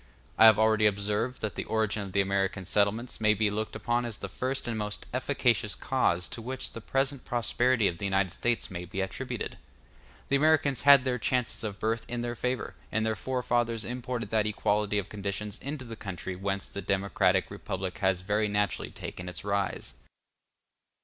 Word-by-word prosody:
I 110 - +7
have 110 -2 +9
already 110 0 +4
observed 105 +5 -1
that 110 - -2
the - - -3
origin 110 -1 0
of 100 -2 -6
the 100 +1 +3
American 95 -1 0
settlements 105 +5 0
may 105 0 +4
be 105 0 +2
looked 110 +1 -3
upon 120 +2 0
as 115 -3 -4
the 100 - -5
first 130 +6 -3
and 120 - -1
most 105 -1 -4
efficacious - - +1
cause 85 -1 +1
to 115 - -6
which 130 +3 -4
the 115 - -7
present 135 +2 -1
prosperity 120 -1 +2
of 85 - -3
the - - -3
United 95 -2 +1
States 120 +2 -1
may 90 -1 -5
be 90 +2 -6
attributed. 95 0 -3 0.7
The 140 - +4
Americans 145 -4 +3
had 140 -2 +10
the 125 -1 0
chances 125 +1 0
of 105 -3 -4
birth 115 +1 -1
in 120 0 -2
their 120 0 -2
favor, 125 +2 -2 0.2
and 110 0 +1
their 110 0 +1
forefathers 120 -1 0
imported 120 -3 -4
that 110 -1 +2
equality 105 0 +1
of 100 -1 -1
conditions 100 0 -4
into 140 -1 -5
the 115 -1 -7
country 95 -3 -5
whence 100 +1 -2
the 100 - -6
democratic 95 -1 +1
republic 95 -4 -4
has 95 -2 +2
very 105 +3 +1
naturally 105 -1 0
taken 90 0 -7
its 90 - -7
rise. 100 -1 -1
105 Hz, 185 wpm, -29 LUFS, 100-120 Hz, 0.7 s, had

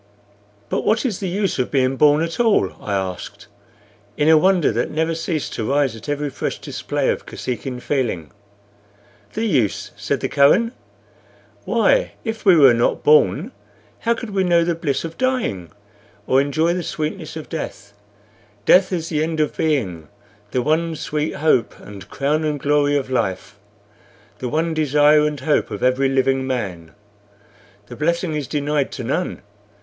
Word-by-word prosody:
"But - - -1
what 225 +5 +1
is 220 -8 -1
the 190 - -3
use 195 -4 -1
of 125 - 0
being 130 -1 +1
born 150 +2 +4
at 165 +4 -4
all?" 220 - +3
I 105 - -5
asked, 95 -2 -5 0.7
in 150 +1 +3
a 160 - +7
wonder 180 0 +3
that - - -1
never 160 +2 -1
ceased 165 -2 -3
to 110 0 -3
rise 140 -4 +1
at 115 +5 -10
every 145 0 -2
fresh - - -3
display - - -2
of - - -5
Kosekin 125 0 -5
feeling. 120 - -2 1.0
"The 225 - -2
use?" 130 - 0
said - - -2
the - - 0
Kohen. 185 +12 +4 0.9
"Why, - - +2
if 225 -2 -5
we 190 -3 +7
were 140 -6 +7
not 115 +1 0
born, 145 -11 +4 0.5
how 235 +1 +1
could 230 -2 -7
we 195 -1 +1
know 170 -2 +3
the 170 0 0
bliss 150 -5 -2
of 165 0 -7
dying, 250 - -1 0.6
or 130 +1 +3
enjoy 155 +4 +1
the 180 - -2
sweetness 155 +1 -4
of 155 - -7
death? 110 -10 -6 0.7
Death 185 +1 +5
is 165 -3 -2
the 155 -2 0
end 160 0 -2
of 150 - 0
being 100 - -1 0.4
the 125 +3 -1
one 160 +3 0
sweet 150 0 -3
hope 150 -5 +1
and 100 -2 -11
crown 150 +3 0
and 150 -2 -1
glory 145 0 +2
of 130 -2 -4
life, 100 -4 -2 0.8
the 125 - -3
one 160 +4 0
desire 150 0 +4
and 150 -3 -4
hope 150 +2 +1
of 105 - -6
every 130 +2 +2
living 135 0 +1
man. 95 -11 -4 0.9
The 120 - -10
blessing 170 +3 -1
is 150 -4 -3
denied 145 0 -1
to 125 - -5
none. 140 +9 -2
150 Hz, 165 wpm, -20 LUFS, 130-165 Hz, 1.0 s, a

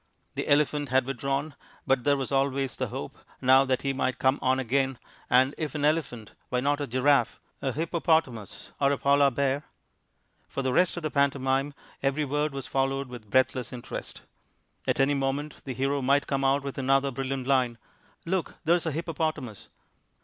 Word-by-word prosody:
The - - -3
elephant 145 -1 +2
had 130 0 +3
withdrawn, 135 +3 -2 0.3
but 135 -3 +1
there 145 -1 +4
was 135 -1 -4
always 135 -2 0
the - - -2
hope - - -7 0.2
now 130 +1 +5
that 130 -1 0
he 135 -1 0
might 130 -1 -1
come 130 +1 +2
on 130 0 +2
again, 135 +1 0 0.3
and 130 +3 +4
if 155 -1 -3
an 145 -1 0
elephant, 145 -8 -1 0.2
why 125 - 0
not 145 +3 0
a 145 - -2
giraffe, 135 +3 +2 0.2
a 135 - 0
hippopotamus, 160 - -1
or 140 0 +4
a 140 - +1
polar 140 +1 +4
bear? 140 +2 0 0.9
For 135 - -3
the 130 -1 0
rest 180 +3 +3
of 175 - -5
the 155 - -2
pantomime 140 0 +1 0.3
every 140 +2 0
word 150 +2 0
was 135 -1 -6
followed 135 0 -1
with 120 -4 -10
breathless 130 +1 +1
interest. 125 -2 -7 0.6
At - - +1
any 135 +1 +4
moment 140 +2 -2
the 135 - -4
hero 135 +2 0
might 140 +2 +3
come 135 -1 -1
out 135 +1 +2
with 140 0 -5
another 135 +1 +2
brilliant 135 0 -3
line 130 -3 +2 0.5
"Look, 185 +1 -2
there's 170 0 +2
a - - 0
hippopotamus." 155 - -3
135 Hz, 180 wpm, -27 LUFS, 130-145 Hz, 0.9 s, now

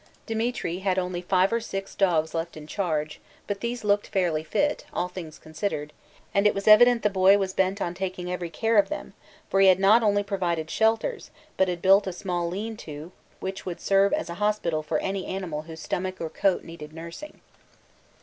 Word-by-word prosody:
Demetri 225 -6 -2
had 190 -1 0
only 180 -1 -2
five 185 +3 +2
or 230 - +2
six 195 -3 -5
dogs 165 -5 +1
left 165 0 -3
in 150 - -9
charge, 155 -3 -2 0.3
but 205 -1 -3
these 235 0 -3
looked 205 0 +2
fairly 175 -6 0
fit, 290 - 0
all 180 - -1
things 170 -4 -8
considered, 155 -2 -4 0.4
and 200 +1 +4
it 210 - +1
was 200 +1 -4
evident 235 +2 +7
the 210 - +4
boy 190 +1 +5
was 190 -2 -2
bent 190 +2 +1
on 175 -3 -2
taking 180 -1 -4
every 180 -1 -3
care 225 +6 +2
of 200 - +2
them, 305 - -6 0.3
for 195 - +1
he 195 - +7
had 185 -1 +6
not 205 +4 +6
only 205 -2 +2
provided 175 -5 -2
shelters, 225 - 0 0.3
but 190 - +3
had 175 -1 -3
built 195 +1 +5
a 185 - -2
small 175 -2 -2
'lean 215 +5 -4
to' 155 -3 -9 0.3
which 190 0 -5
would 180 -2 -5
serve 195 0 +3
as - - -1
a 170 - -5
hospital 205 -7 0
for 155 - -1
any 195 -1 -3
animal 180 -6 -4
whose 160 0 -10
stomach 185 +3 -3
or 160 -1 -4
coat 195 -2 +1
needed 155 -2 -10
nursing. 170 - -9
190 Hz, 200 wpm, -26 LUFS, 170-205 Hz, 0.4 s, evident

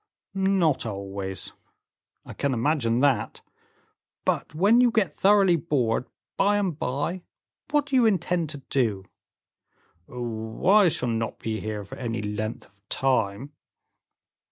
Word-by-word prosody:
"Not 190 -6 +2
always." 100 -3 -5 0.7
"I - - -9
can 140 -2 -1
imagine 120 -2 +1
that; 140 -2 +1 0.8
but - - -1
when 205 +9 +5
you 250 - +5
get 220 -5 0
thoroughly 195 -3 +5
bored, 125 -7 0 0.3
by 205 +1 +3
and 190 -6 0
by, 145 +8 -2 0.5
what 295 -1 +2
do 275 -1 -2
you 245 -3 +5
intend 175 -5 0
to 145 - -6
do?" 110 -8 0 1.0
"Oh! 110 -1 -5
I 200 +1 +6
shall 125 -6 0
not 115 -1 -2
be 110 -1 -3
here 105 -1 -4
for 100 - -10
any 115 -3 -3
length 105 +1 -4
of 100 0 -28
time. 130 0 0
135 Hz, 130 wpm, -25 LUFS, -, 1.0 s, I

